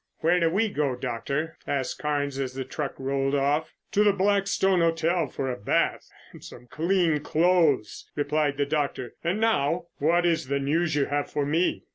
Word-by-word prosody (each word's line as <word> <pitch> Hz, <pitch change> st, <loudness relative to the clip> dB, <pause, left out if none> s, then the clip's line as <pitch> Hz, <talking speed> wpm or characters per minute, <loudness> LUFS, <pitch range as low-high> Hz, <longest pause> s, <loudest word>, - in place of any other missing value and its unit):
"Where 175 Hz, +3 st, +3 dB
do 165 Hz, -1 st, +3 dB
we 200 Hz, +7 st, +1 dB
go, 145 Hz, -9 st, -1 dB
Doctor?" 140 Hz, +6 st, -3 dB
asked 135 Hz, -2 st, -2 dB
Carnes 145 Hz, -2 st, -1 dB
as 130 Hz, -1 st, -3 dB
the 135 Hz, -1 st, -4 dB
truck 140 Hz, +2 st, -4 dB
rolled 135 Hz, +1 st, -1 dB
off. 145 Hz, +3 st, +1 dB, 0.2 s
"To 210 Hz, -, +3 dB
the 205 Hz, -, +5 dB
Blackstone 195 Hz, -1 st, +2 dB
Hotel 165 Hz, 0 st, +1 dB
for 130 Hz, 0 st, -3 dB
a -, -, -3 dB
bath 105 Hz, -, 0 dB, 0.2 s
and -, -, -14 dB
some -, -, -11 dB
clean 165 Hz, +2 st, +1 dB
clothes," 160 Hz, -5 st, +1 dB
replied 145 Hz, -1 st, 0 dB
the 145 Hz, -, +1 dB
doctor. 140 Hz, -4 st, -2 dB
"And 175 Hz, +5 st, 0 dB
now, 180 Hz, -7 st, +1 dB
what 170 Hz, +4 st, +2 dB
is 165 Hz, -5 st, +1 dB
the 140 Hz, +1 st, 0 dB
news 155 Hz, +3 st, 0 dB
you 145 Hz, -2 st, +2 dB
have 145 Hz, 0 st, -2 dB
for 145 Hz, -, -1 dB
me?" 165 Hz, +5 st, 0 dB
150 Hz, 180 wpm, -26 LUFS, 140-170 Hz, 0.2 s, the